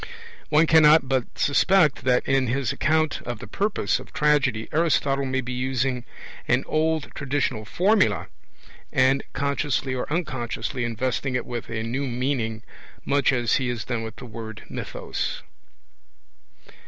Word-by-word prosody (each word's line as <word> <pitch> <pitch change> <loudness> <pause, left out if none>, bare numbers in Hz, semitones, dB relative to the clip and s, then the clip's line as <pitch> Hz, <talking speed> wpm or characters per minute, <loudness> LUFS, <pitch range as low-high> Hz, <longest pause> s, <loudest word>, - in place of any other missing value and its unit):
2). - - -7 0.4
One 155 +2 +5
cannot 155 -2 +6
but 130 -2 -1
suspect 150 -1 +3
that 125 -1 +2
in 135 -1 +2
his 130 0 0
account 155 0 +1
of 120 -1 -5
the 105 - -9
purpose 200 - 0
of - - -12
tragedy 140 -7 +2
Aristotle 145 -4 +1
may 130 0 0
be 125 0 -5
using 125 0 -1 0.4
an 125 +2 +2
old 155 -1 0
traditional 135 -5 -2
formula, 195 - +2 0.7
and 130 +1 +3
consciously 140 -1 -1
or 130 +2 -4
unconsciously 130 -5 -2
investing 125 +3 -2
it 125 - -1
with 120 -2 -6
a 110 -1 -3
new 130 +5 -2
meaning, 120 -3 -2 0.4
much 140 -1 +3
as 120 -3 +2
he 130 -2 -1
has 120 -2 -3
done 120 -3 -2
with 110 -1 -6
the 125 - -10
word 110 -2 -8
mythos. - - -4
130 Hz, 145 wpm, -24 LUFS, 120-145 Hz, 0.7 s, cannot